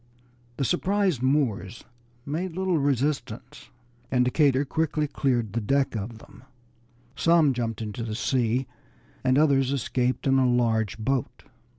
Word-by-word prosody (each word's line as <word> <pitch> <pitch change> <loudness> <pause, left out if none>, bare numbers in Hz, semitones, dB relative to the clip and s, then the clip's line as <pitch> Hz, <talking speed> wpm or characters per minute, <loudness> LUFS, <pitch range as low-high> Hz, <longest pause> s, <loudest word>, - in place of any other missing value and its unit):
The 135 - 0
surprised 190 - +1
Moors 120 -7 0 0.4
made 165 +4 -3
little 185 -3 0
resistance, 140 +1 -2 0.4
and 125 -1 +2
Decatur 140 +1 +2
quickly 155 +1 -1
cleared 125 -7 -1
the 115 - -1
deck 135 +3 0
of 110 +2 -5
them; - - -16 0.7
some 165 -4 +4
jumped 115 -2 -3
into 105 +2 -6
the 110 -2 -4
sea, 125 0 0 0.6
and 130 0 +3
others 140 -3 +3
escaped 125 -1 -1
in 135 -1 +3
a 130 -1 +3
large 115 -4 +1
boat. 130 +3 -2
130 Hz, 130 wpm, -26 LUFS, 120-145 Hz, 0.7 s, some